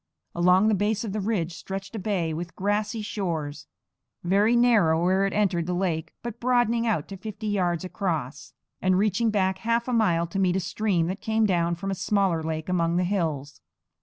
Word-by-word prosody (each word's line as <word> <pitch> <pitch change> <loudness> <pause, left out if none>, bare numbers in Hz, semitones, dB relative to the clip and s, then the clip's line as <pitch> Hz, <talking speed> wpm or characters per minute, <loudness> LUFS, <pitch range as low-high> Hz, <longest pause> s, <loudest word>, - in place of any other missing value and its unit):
Along 180 +4 +4
the 220 - +3
base 205 +2 0
of 210 -4 -4
the 215 - -1
ridge 190 -5 -1
stretched 195 +4 -7
a - - -3
bay 185 -5 -1
with 170 +3 -6
grassy 210 +3 -1
shores, 160 -8 -4 0.6
very 200 +6 +3
narrow 210 -10 +4
where 190 +2 +3
it 195 - -4
entered 180 -5 +1
the 180 - -1
lake, 175 -4 -1
but 235 -1 -6
broadening 235 -1 +2
out 185 -10 0
to 195 - -7
fifty 215 +2 -7
yards 180 -5 0
across, 165 -8 -3 0.3
and 185 0 +3
reaching 215 +3 +2
back 190 -3 0
half 230 +1 0
a 250 - -1
mile 175 -8 +2
to 170 +3 -4
meet 185 -2 +2
a - - +2
stream 180 -1 0
that 185 +4 -4
came 220 0 +1
down 170 -3 +1
from 195 +3 -4
a - - 0
smaller 190 -2 +1
lake 160 0 -4
among 170 -2 +1
the 180 - +2
hills. 160 -7 -2
190 Hz, 195 wpm, -26 LUFS, 170-215 Hz, 0.6 s, Along